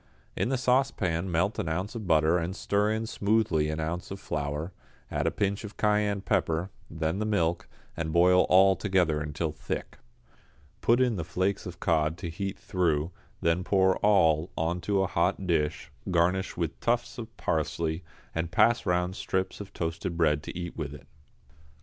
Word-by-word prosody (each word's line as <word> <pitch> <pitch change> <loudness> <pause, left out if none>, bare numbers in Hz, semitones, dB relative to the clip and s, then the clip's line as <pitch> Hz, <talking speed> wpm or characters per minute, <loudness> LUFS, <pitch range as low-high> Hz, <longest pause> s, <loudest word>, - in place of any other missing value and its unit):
In - - 0
the 135 - +1
saucepan 105 -9 +1
melt 90 +6 +1
an 80 - -1
ounce 90 +6 -2
of 110 -5 -6
butter 80 +1 +4
and 85 +3 -3
stir 100 0 +1
in 110 +1 -1
smoothly 100 -8 +1
an 80 0 -3
ounce 80 +3 -3
of 95 - -6
flour, 75 +3 -3 0.4
add - - 0
a - - +5
pinch 100 +1 -1
of 105 -1 -9
cayenne 105 -1 +1
pepper, 90 -3 0 0.2
then 80 +3 -2
the - - 0
milk, 85 -5 0 0.3
and 80 -1 -3
boil 90 +2 +5
all 95 +1 +6
together 90 -7 +1
until 75 +2 -2
thick. 75 - -5 0.8
Put 120 +2 +4
in 125 -5 +2
the 85 - -2
flakes 95 +5 -1
of 90 0 -8
cod 80 -1 +1
to 85 -1 -5
heat 95 +3 -4
through, 85 -3 0 0.3
then 85 +2 +1
pour 95 0 +3
all 85 -6 +3
on 85 +2 -1
to 100 0 +1
a - - +1
hot 90 +3 0
dish, 75 -4 0 0.2
garnish 90 +2 +1
with 85 -3 -2
tufts 120 +2 -1
of 115 0 -9
parsley, 80 +1 -1 0.3
and 80 0 -2
pass 110 +4 +3
round 90 +1 +1
strips 95 +1 -2
of 100 - -9
toasted 85 +1 -3
bread 75 -3 +3
to 80 - -7
eat 85 -1 -5
with 75 -3 -5
it. 70 - -13
90 Hz, 175 wpm, -28 LUFS, 80-100 Hz, 0.8 s, all